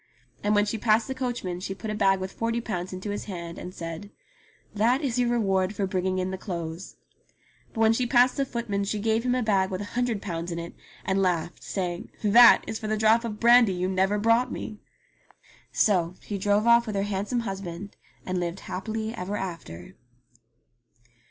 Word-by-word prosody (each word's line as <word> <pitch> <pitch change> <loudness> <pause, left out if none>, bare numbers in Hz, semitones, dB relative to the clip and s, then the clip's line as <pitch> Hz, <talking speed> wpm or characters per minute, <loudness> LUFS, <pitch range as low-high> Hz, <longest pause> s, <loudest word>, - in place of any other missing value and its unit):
And 210 +1 +2
when 205 0 +4
she 220 +1 -3
passed 220 0 +3
the 265 - -2
coachman 240 -9 -3
she 190 +1 -5
put 215 +2 -5
a - - -2
bag 195 -2 +3
with 190 0 -4
forty 230 +1 -1
pounds 185 -6 -4
into 185 +2 -5
his 205 - -4
hand 170 -4 -7
and 180 - -7
said, 165 +3 -7 0.6
"That 235 +7 +2
is 250 -3 0
your 245 -1 +2
reward 195 -4 +1
for 200 - 0
bringing 185 0 -1
in 185 0 -1
the 190 - -5
clothes." 170 -2 -6 0.8
But 225 - -3
when 225 0 +5
she 245 +2 0
passed 250 +1 +4
the 275 - +2
footman 230 -5 -2
she 200 +2 -2
gave 220 +2 +1
him 250 0 +1
a 250 - 0
bag 195 -3 +2
with 185 -2 -3
a - - -4
hundred 245 -3 0
pounds 175 -3 -4
in 170 - -4
it, 170 0 -6 0.3
and 190 +1 +1
laughed, 175 -2 -1
saying, 175 -3 -4
"That 230 +3 +7
is 220 - -4
for 215 - -5
the 215 0 0
drop 220 +2 +4
of 215 -3 -5
brandy 235 -3 +6
you 180 0 -1
never 190 +2 +1
brought 230 +4 +2
me 215 -1 -6 0.5
!" - - -29
So 180 -4 +2
she 205 -2 -5
drove 205 +2 +2
ofT 235 0 +5
with 215 - -3
her 195 - +1
handsome 205 +4 -1
husband, 195 -2 -6 0.3
and 185 -1 -1
lived 175 +1 -3
happy 220 +4 -4
ever 205 -2 -4
after. 165 - -7
205 Hz, 205 wpm, -26 LUFS, 185-225 Hz, 0.8 s, That